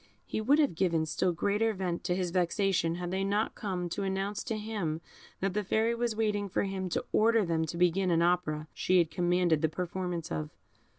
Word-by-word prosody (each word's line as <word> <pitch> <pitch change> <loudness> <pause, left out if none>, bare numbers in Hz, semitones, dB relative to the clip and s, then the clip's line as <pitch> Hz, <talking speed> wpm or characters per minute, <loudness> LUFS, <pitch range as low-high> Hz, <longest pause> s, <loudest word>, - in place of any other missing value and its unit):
He - - -3
would 270 +7 +4
have 295 - +3
given 165 -2 +1
still 180 +3 0
greater 205 +6 +1
vent 180 -2 -2
to 180 -1 +1
his 180 -2 -1
vexation 180 -1 +1
had 175 0 -4
they 190 +1 0
not 205 +3 0
come 185 -4 -3
to 200 - -3
announce 195 +1 -2
to 225 - -2
him 210 -8 -3 0.4
that 195 -1 0
the 210 +1 0
Fairy 220 +4 +1
was 235 -1 -1
waiting 210 -2 0
for - - 0
him 190 -2 -3
to - - -2
order 225 -1 +4
them 165 -1 0
to 170 - -5
begin 180 +2 +2
an 170 -1 +3
opera 160 -3 +1
she 185 - +2
had 170 -3 +3
commanded 175 -3 +2
the 160 - +2
performance 180 0 -4
of. 75 -1 -3
185 Hz, 210 wpm, -30 LUFS, 170-205 Hz, 0.4 s, would